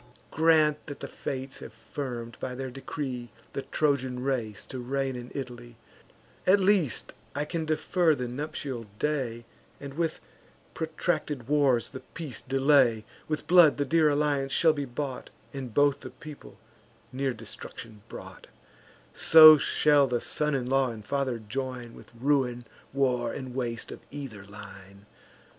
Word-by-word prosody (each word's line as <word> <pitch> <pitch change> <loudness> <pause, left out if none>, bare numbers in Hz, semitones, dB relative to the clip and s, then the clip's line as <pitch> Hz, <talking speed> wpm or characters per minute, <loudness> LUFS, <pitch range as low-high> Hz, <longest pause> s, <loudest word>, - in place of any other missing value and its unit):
Grant 155 -2 +3
that 145 - -7
the - - -6
Fates 130 0 -5
have 110 - -10
firm'd, 120 -1 -6
by 125 -1 -4
their 130 0 -5
decree, 130 -2 -5 0.2
The 135 - -2
Trojan 130 -4 0
race 120 -6 -2
to 130 - -7
reign 135 +1 -2
in 125 0 -7
Italy; 120 -3 -7 0.7
At 195 +2 +6
least 185 - +1 0.2
I 145 +1 -1
can 160 +1 -3
defer 160 +1 +2
the 125 -2 -3
nuptial 130 -2 -5
day, 125 -6 -2 0.3
And 140 -1 -8
with 165 +2 -1 0.5
protracted 155 -5 -2
wars 140 -5 +2
the 130 - -8
peace 145 -6 -8
delay: 135 -5 +3 0.2
With 155 0 -3
blood 170 -3 +6
the 145 - 0
dear 160 +1 +4
alliance 145 -2 +1
shall 160 +2 +4
be 145 -2 -3
bought, 130 +1 -5 0.2
And 135 -3 -6
both 145 +3 +3
the - - -8
people 155 -3 -12 0.6
near 135 +1 0
destruction 110 -1 -9
brought; - - -10 0.7
So 155 -1 +9
shall 145 0 +4
the 125 -2 0
son 150 +3 0
in 130 -2 -1
law 135 0 +2
and 110 -3 -8
father 135 -2 -1
join, 120 +1 -5
With - - -14
ruin, 125 -3 +1 0.3
war, 125 -3 +1
and 130 -2 -6
waste 120 -3 -3
of - - -8
either 135 -8 -7
line. 100 -1 -12
135 Hz, 150 wpm, -28 LUFS, 120-150 Hz, 0.7 s, So